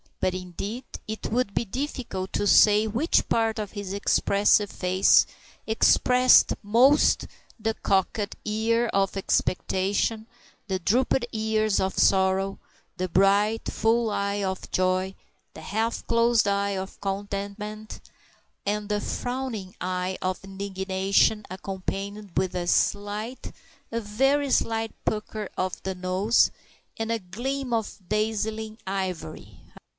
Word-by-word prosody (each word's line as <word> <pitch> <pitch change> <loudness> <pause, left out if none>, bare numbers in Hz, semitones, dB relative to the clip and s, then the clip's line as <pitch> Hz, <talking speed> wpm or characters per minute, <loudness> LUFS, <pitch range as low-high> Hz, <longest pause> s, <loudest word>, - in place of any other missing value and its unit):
But, 185 - +1
indeed, 190 +7 -5 0.2
it 220 0 -5
would 235 -3 0
be 235 - +1
difficult 245 -5 -4
to 205 - 0
say 210 +1 +6
which 245 - +1
part 225 -1 +1
of 210 -2 -4
his 205 -3 -6
expressive 200 0 +3
face 185 +1 +4 0.4
expressed 250 +3 +5
most 245 +8 +4 0.3
the 225 +1 0
cocked 200 +2 0
ears 225 +2 +1
of 195 0 +1
expectation, 195 +3 0 0.4
the 190 -2 -1
drooped 240 +6 +1
ears 215 -1 +1
of 190 0 -1
sorrow; 190 0 +2 0.4
the 185 0 -2
bright, 200 +5 +3
full 225 +1 +2
eye 200 0 -1
of 190 -1 -3
joy, 185 +1 0 0.4
the - - -9
half 225 +3 -2
closed 230 -2 +3
eye 200 0 +1
of 190 0 -7
contentment, 205 +2 -5 0.7
and 210 +1 -2
the 210 0 0
frowning 245 -7 -4
eye 185 +1 -2
of 185 +1 -2
indignation 195 +2 0
accompanied 195 +1 -5
with 185 -1 +1
a 175 -1 -2
slight, 205 +7 -1 0.4
a 230 - -1
very 270 +6 +1
slight 225 -2 +1
pucker 215 -1 -3
of 185 0 -2
the 190 - -3
nose 185 +5 +2 0.5
and 225 0 -2
a 230 - 0
gleam 250 +8 -4
of 225 -2 -2
dazzling 215 +1 -2
ivory 180 - -4 0.2
ha! - - -17
205 Hz, 125 wpm, -26 LUFS, 190-225 Hz, 0.7 s, say